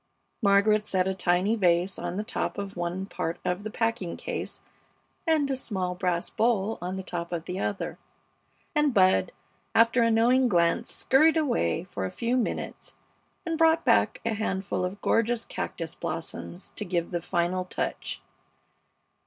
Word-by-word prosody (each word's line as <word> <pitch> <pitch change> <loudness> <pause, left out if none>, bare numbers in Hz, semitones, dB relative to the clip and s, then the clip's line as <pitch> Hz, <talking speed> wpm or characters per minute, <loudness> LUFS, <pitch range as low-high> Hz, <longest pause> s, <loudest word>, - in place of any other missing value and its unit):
Margaret 210 +1 +4
set 185 -1 +1
a 190 - +1
tiny 185 +3 +2
vase 180 -2 +2
on 175 +1 -3
the 210 - -1
top - - -3
of 200 -1 -5
one 175 +2 -2
part 170 -3 -3
of 180 +3 -1
the 215 - -4
packing 225 -5 -1
case - - -5 0.7
and 310 -3 +3
a - - +1
small 190 -8 -2
brass 180 -1 -1
bowl 220 -2 +1
on 180 +2 -3
the 190 - -4
top 170 -1 -5
of 170 -2 -3
the 180 +2 -4
other, 200 - -3 0.7
and 295 -4 +2
Bud, 185 - +4 0.4
after 230 +2 +5
a 230 - +4
knowing 245 +3 +4
glance, 170 +5 +2
scurried 315 +5 +4
away 160 - +1
for - - -5
a - - -5
few 235 - -1
minutes 250 - -3 0.5
and 330 -1 -2
brought 325 0 +4
back - - +3
a 230 - +1
handful 190 -3 -2
of 185 +3 -3
gorgeous 230 +1 +2
cactus 165 -1 -5
blossoms 175 +2 -6
to - - -2
give 175 -2 -2
the 175 -1 -1
final 175 +1 0
touch. 180 - -4
195 Hz, 160 wpm, -27 LUFS, 180-230 Hz, 0.7 s, after